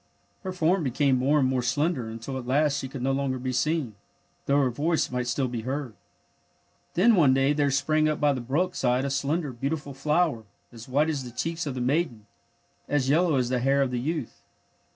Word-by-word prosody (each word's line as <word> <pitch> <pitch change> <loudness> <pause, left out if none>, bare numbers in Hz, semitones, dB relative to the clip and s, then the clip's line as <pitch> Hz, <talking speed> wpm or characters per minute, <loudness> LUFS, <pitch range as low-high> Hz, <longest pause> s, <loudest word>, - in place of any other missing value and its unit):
Her 190 - -4
form 180 0 +1
became 135 0 +2
more 135 +4 +2
and 135 -3 +3
more 130 -1 0
slender 145 +2 0
mitil 115 +4 -6
at 120 - -9
last 145 +2 +2
she 135 - -4
could 135 -1 -7
no 135 - +1
longer 135 -1 -1
be 130 0 -3
seen, 150 -3 0 0.5
though 140 - +3
her 130 -3 +2
voice 155 +5 0
might 125 -1 -2
still 130 +2 0
be 120 -2 -4
heard. 130 0 -4 1.0
Then 220 +7 +5
one 145 -9 +5
day 135 +2 +3
there 145 -1 +1
sprang 155 +3 +2
up 155 - -2
by 145 -1 +3
the 130 - -4
brook 160 +10 0
side 125 +1 +1
a 140 - -2
slender, 145 +2 -1
beautiful 140 +3 -3
flower, 150 -3 0 0.3
as 115 0 -12
white 150 +5 +2
as 140 -4 -3
the 125 - -7
cheeks 165 +6 -3
of 135 - -3
the 125 - -3
maiden, 125 -4 -1 0.6
as 140 -3 +1
yeUow 165 -1 +3
as 125 -2 0
the 125 -1 0
hair 135 +2 +2
of 130 - -2
the 125 - -1
youth. 150 -1 -4
140 Hz, 215 wpm, -26 LUFS, 125-155 Hz, 1.0 s, Then